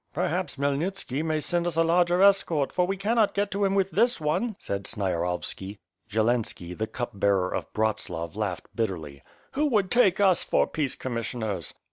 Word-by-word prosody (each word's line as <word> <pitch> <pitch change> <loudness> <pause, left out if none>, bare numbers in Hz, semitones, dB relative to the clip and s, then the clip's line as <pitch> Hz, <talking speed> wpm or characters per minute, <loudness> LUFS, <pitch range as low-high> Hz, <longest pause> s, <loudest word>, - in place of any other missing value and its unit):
"Periiaps - - -1
Khmyelnitski 140 +1 -1
may 155 -1 0
send 175 +4 0
us 170 - -2
a 165 - +4
larger 175 +2 +3
escort, 175 -8 +3
for 180 -1 +1
we 195 +1 -1
cannot 215 +2 +2
get 200 0 0
to 200 +1 -1
him 195 0 +2
with 195 -1 +1
this 240 +4 +2
one," 175 +9 0
said 100 0 -4
Sniarovski. 95 0 -2 0.3
Zielanski, 110 -5 0
the 110 +3 -2
Cup 120 +1 -4
Bearer 100 -2 +1
of - - -4
Bratslav, 105 -6 -2
laughed 105 -5 -4
bitterly. 80 - -3 0.3
"Who 300 +2 +1
would 210 -8 +1
take 205 -7 +4
us 190 -3 +4
for - - +2
peace 145 -4 -2
commissioners?" 115 -4 -4
150 Hz, 170 wpm, -26 LUFS, -, 0.3 s, a